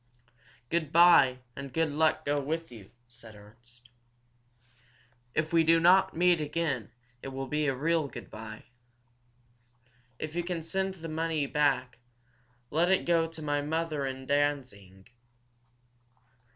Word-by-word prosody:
"Good 160 -3 -1
bye, 165 -7 +6 0.2
and 140 0 -7
good 160 +2 0
luck 155 +2 +1
go 145 0 +1
with 160 +2 -4
you," 110 -5 -12 0.2
said 115 -3 -11
Ernst. 120 +4 -18 1.5
"If 155 +1 -1
we 165 -1 +5
do 165 +1 +4
not 180 +3 +4
meet 175 -2 +3
again 150 -6 -2 0.3
it - - -7
will 135 0 -5
be 150 +2 -1
a 135 - 0
real 155 +2 0
good 120 -3 -10
bye. 110 0 -9 1.5
If 155 +3 -6
you 175 - -1
can 170 -2 -4
send 190 +3 -2
the 165 -2 -8
money 160 -1 -1
back, 135 -4 0 0.7
let 170 +4 +2
it 190 - +2
go 165 -1 +2
to 160 -1 -11
my 145 -1 0
mother 155 -1 -2
in 130 0 -6
Danzig. 130 -10 -2
150 Hz, 140 wpm, -29 LUFS, 130-165 Hz, 1.5 s, bye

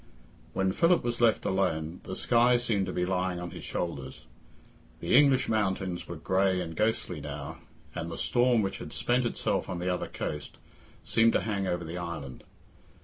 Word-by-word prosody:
When 95 0 +1
Philip 170 - +3
was 120 0 -2
left 115 -2 +3
alone, 85 -3 0
the 95 - -5
sky 120 +3 +4
seemed 110 -5 0
to - - -2
be 90 - 0
lying 90 -1 -1
on 90 -1 -5
his - - -9
shoulders. 70 -6 -4 0.7
The - - +1
English 140 -3 +5
mountains 95 -4 -1
were 85 - -5
grey 95 +3 +1
and 85 -2 -4
ghostly 105 -6 0
now, 70 0 -6 0.3
and 85 - -4
the 85 - -6
storm, 120 -2 +3
which 95 - -3
had - - -8
spent 125 +1 +1
itself - - -1
on 90 - -3
the 90 +1 0
other 90 - -3
coast, 75 -1 -5 0.5
seemed 115 0 +3
to - - +2
hang 100 -3 -1
over 90 -1 -1
the 85 +2 -5
island. 85 -7 -6
95 Hz, 180 wpm, -29 LUFS, 85-115 Hz, 0.7 s, English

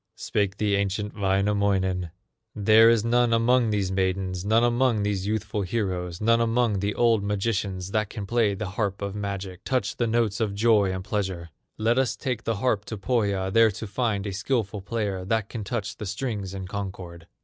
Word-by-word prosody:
Spake 100 -1 -1
the 105 -2 +1
ancient 100 +1 -2
Wainamoinen: 95 -2 +1 0.5
"There 110 +2 +6
is 115 -1 +3
none 120 0 +3
among 115 +1 +3
these 100 -3 0
maidens, 95 -1 -1
None 110 +3 +3
among 120 -2 +2
these 100 -1 -1
youthful 105 -1 -2
heroes, 90 -4 -2
None 115 +2 +3
among 115 -3 +1
the 100 +2 -1
old 115 -3 +3
magicians 100 -2 -2
That 110 -1 0
can 105 -4 -6
play 110 -2 +1
the 100 0 -4
harp 100 -1 -2
of 100 -1 -3
magic, 100 -2 -5
Touch 125 -6 -1
the 120 - +1
notes 115 -2 +1
of 105 -3 -1
joy 105 -3 +3
and 95 0 -4
pleasure. 95 -5 -3 0.3
Let 115 +3 +2
us 130 -2 +1
take 125 -5 -3
the 115 - 0
harp 105 -2 0
to 110 - -6
Pohya, 100 -3 0
There 115 -1 +6
to 105 +2 -6
find 105 -1 -1
a 100 - -3
skillful 105 -1 -1
player 100 -2 -3
That 110 +2 -1
can 115 -4 -5
touch 105 -1 -3
the 105 - -6
strings 100 -2 -4
in 95 -1 -5
concord." 95 -4 -7
105 Hz, 185 wpm, -25 LUFS, 95-115 Hz, 0.5 s, There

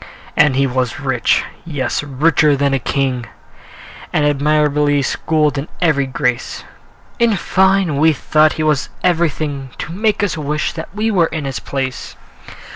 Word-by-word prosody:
And 150 -3 +4
he 135 +1 +3
was 130 -2 -2
rich, 130 -4 +1 0.2
yes, 145 -6 -2
richer 145 +1 +2
than 140 0 +1
a 135 - +1
king, 125 -2 -1 0.8
And 150 - +1
admirably 145 0 +2
schooled 150 +1 0
in 140 - -5
every 145 -6 +2
grace: 125 -2 -2 0.6
In 230 -3 +3
fine, 190 -4 +2
we 160 +2 +5
thought 155 +1 +3
that - - -6
he 155 - -2
was 150 -3 +1
everything 155 -6 0
To 175 - -6
make 210 +2 0
us 195 -6 0
wish 150 -1 -2
that 160 - -7
we 220 +1 0
were 175 -5 +3
in 155 -3 -5
his 135 -1 -3
place. 135 -2 -4
150 Hz, 155 wpm, -17 LUFS, 135-160 Hz, 0.8 s, we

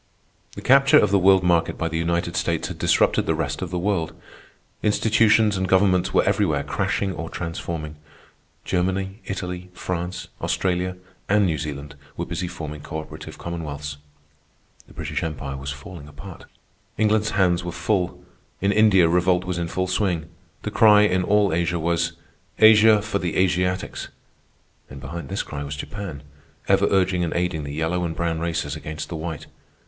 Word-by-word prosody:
The - - -8
capture 135 +1 +6
of 105 - +4
the 100 - +4
world 95 0 +5
market 85 -2 +2
by 80 - -1
the 80 0 -2
United 85 +1 -1
States 85 -2 -1
had - - -7
disrupted - - +2
the 80 - +2
rest 75 -2 -3
of 95 - -3
the 90 - -3
world. 90 -3 -1 0.6
Institutions 105 -1 +3
and 95 0 -1
governments 95 -1 +3
were - - +3
everywhere 95 -8 +1
crashing 95 +6 -1
or 80 0 -6
transforming. 80 -2 -5 0.7
Germany, 95 +2 -1
Italy, 90 -1 -5
France, 90 0 -4
Australia, 90 0 -1 0.3
and 105 0 +4
New 80 -4 0
Zealand 75 -1 -6 0.2
were - - -2
busy 90 - -3
forming 75 -4 -7
cooperative 80 +1 -7
commonwealths. 75 -4 -5 0.9
The - - -18
British - - -3
Empire 70 -4 -4
was 70 +1 -6
falling 70 +3 -8
apart. 85 +5 -11 0.5
England's 110 0 +2
hands 90 -3 +3
were 85 - -4
full. 90 +2 -1 0.3
In 100 +1 +2
India 100 -5 +5
revolt 90 +1 +2
was 90 -1 -2
in 85 - -2
full 95 +2 -1
swing. 90 -4 -1 0.3
The - - -3
cry 105 -2 +6
in 95 -3 +2
all 105 -2 +3
Asia 85 +1 0
was, 85 0 0 0.4
"Asia 110 -1 +7
for 105 -2 -2
the 85 -3 -2
Asiatics!" 90 0 0 0.8
And 65 - -9
behind 70 +3 -7
this - - -2
cry 70 - -6
was 70 0 -5
Japan, 80 -1 -7 0.4
ever - - +4
urging 95 -2 +2
and 85 - -2
aiding 85 -4 -1
the 70 - -5
yellow 80 +3 -1
and 80 -2 -3
brown 85 -1 -1
races 80 -3 -2
against 75 -1 -6
the 85 - -5
white. 80 -1 -5
90 Hz, 165 wpm, -23 LUFS, 80-95 Hz, 0.9 s, Asia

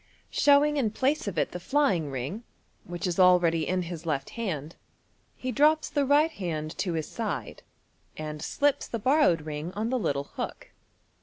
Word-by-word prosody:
Showing 290 +1 +4
in 245 -6 +2
place 265 +4 0
of 200 - -4
it - - +1
the 180 - -5
flying 190 - +1
ring, 135 - -4 0.4
which 175 0 -5
is 180 0 -1
already 175 -3 +4
in 185 0 0
his 170 -1 -7
left 145 -5 -2
hand, 165 - -4 0.6
he 255 - -4
drops 305 +5 +3
the 285 -2 +1
right 300 +3 +4
hand 160 - -4
to 185 -2 -1
his 160 -2 -2
side, - - -4 0.6
and 155 -1 -5
slips 285 - 0
the 230 - -3
bor 265 +8 +2
rowed 170 - +4
ring 150 +2 -5
on 220 +3 -2
the 255 - +1
little 140 -9 -1
hook. - - -5
180 Hz, 175 wpm, -27 LUFS, -, 0.6 s, Showing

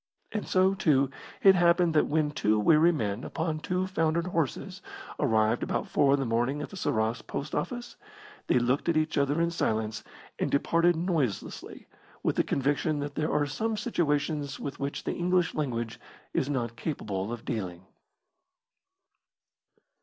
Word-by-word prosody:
And 215 - -3
so, 185 +1 +3
too, 140 -8 +2 0.3
it 195 - +9
happened 175 -1 +4
that 155 - +3
when 150 -1 +1
two 110 -7 +1
weary 155 +9 +5
men, 110 -6 -2
upon 160 -1 -2
two 180 +3 -1
foundered 170 -2 0
horses, 165 -7 -2 0.4
arrived 110 +1 +2
about - - -1
four 140 -1 +3
in - - -2
the 135 - -1
morning 120 +5 0
at - - -6
the - - -8
Sarras 110 -9 0
post 140 - -5
office, 245 -1 -4 0.5
they - - +3
looked 125 +7 +1
at 165 - +2
each 155 0 0
other 140 +2 +1
in 170 0 +2
silence 110 -8 -1 0.4
and - - 0
departed 170 +4 +3
noiselessly, 160 - -2 0.4
with - - +1
the - - +3
conviction 145 +3 0
that 145 0 -4
there 155 +1 -1
are 145 - +2
some 220 +10 -2
situations 150 - -1
with 140 - -6
which 140 +1 -3
the - - -2
English 180 -1 +1
language 120 -5 -3 0.3
is 135 - 0
not 120 -5 -2
capable 105 - -3
of 120 -1 -6
dealing. 95 -7 -4
145 Hz, 160 wpm, -28 LUFS, 120-170 Hz, 0.5 s, it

